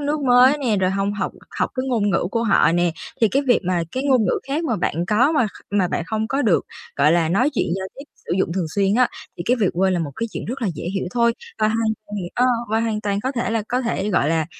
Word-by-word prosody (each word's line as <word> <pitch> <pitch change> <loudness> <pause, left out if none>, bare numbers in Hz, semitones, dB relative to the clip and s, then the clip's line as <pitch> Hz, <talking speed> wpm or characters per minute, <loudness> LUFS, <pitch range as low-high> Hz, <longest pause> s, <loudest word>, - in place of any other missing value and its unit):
nước 290 +1 -1
mới 255 +2 +5
nè 240 -7 0
rồi 185 -1 +1
hông 195 +1 -1
học 205 -2 -3 0.3
học - - 0
cái 255 0 -2
ngôn 210 -5 +1
ngữ 175 0 +1
của 230 -1 0
họ 205 -6 +4
nè, 175 0 +2 0.3
thì 225 - +5
cái 275 +5 +1
việc 245 - +4
mà 180 -2 0
cái 260 - -2
ngôn 255 -6 +3
ngữ - - +1
khác 310 +5 -1
mà 230 -8 0
bạn 175 - -1
có 245 +9 +3
mà 270 -8 +2
kh - - -12
mà 195 -3 +1
bạn - - -2
không 220 0 -2
có 275 +1 0
được, 210 -7 +2 0.3
gọi 145 +3 +4
là, 165 -2 +2
nói 245 - +2
chuyện - - +1
giao 190 - -4
tiếp, 275 - -9 0.2
sử - - -2
dụng 170 - 0
thường 180 -3 -1
xuyên 200 0 +2
á 250 +1 +4 0.3
thì 170 - -4
cái 250 +2 +3
việc 200 - +3
quên 190 +2 +1
là 175 - 0
một 155 -4 -3
cái 230 - -2
chuyện - - -5
rất 250 +2 -5
là 210 - +1
dễ - - -7
hiểu 195 - -2
thôi 235 -1 +2 0.3
và 215 - +3
hoàn 225 0 0 0.2
toàn 210 - -6 0.2
ơ, 250 +1 +3 0.2
và 220 +1 +2
hoàn 220 -2 -1
toàn 200 -2 -1
có 260 +4 -2
thể 235 -2 -2
là 225 -1 0
có 250 +1 0
thể, 230 -4 -2
gọi 150 -6 +2
là, 160 -1 +1
215 Hz, 285 wpm, -21 LUFS, 190-250 Hz, 0.3 s, mới